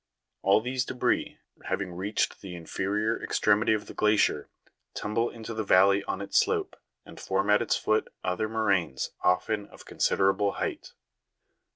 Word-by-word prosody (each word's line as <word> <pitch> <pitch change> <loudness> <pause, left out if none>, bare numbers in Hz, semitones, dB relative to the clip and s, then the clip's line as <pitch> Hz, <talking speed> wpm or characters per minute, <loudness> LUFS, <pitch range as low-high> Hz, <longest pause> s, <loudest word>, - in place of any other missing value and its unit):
All 100 +2 +4
these 125 +2 -1
debris, 125 -1 -1 0.3
having 95 -3 -2
reached 100 +4 -2
the 95 -3 -8
inferior 100 +6 -2
ex - - -2
tremity 105 +1 +3
of 105 - -5
the - - -10
glacier, 105 -8 +2 0.5
tumble 115 +3 -1
into 115 0 -8
the 110 0 -2
valley 100 +1 +4
on 95 - -3
its 100 - +2
slope, - - 0 0.3
and - - -12
form 95 +2 0
at 105 - +5
its 120 - +1
foot 110 0 +1 0.2
other 110 +4 -1
moraines 100 -10 0
often 100 +3 +1
of - - -15
considerable 95 +1 +1
height. - - -4
105 Hz, 155 wpm, -28 LUFS, 95-110 Hz, 0.5 s, at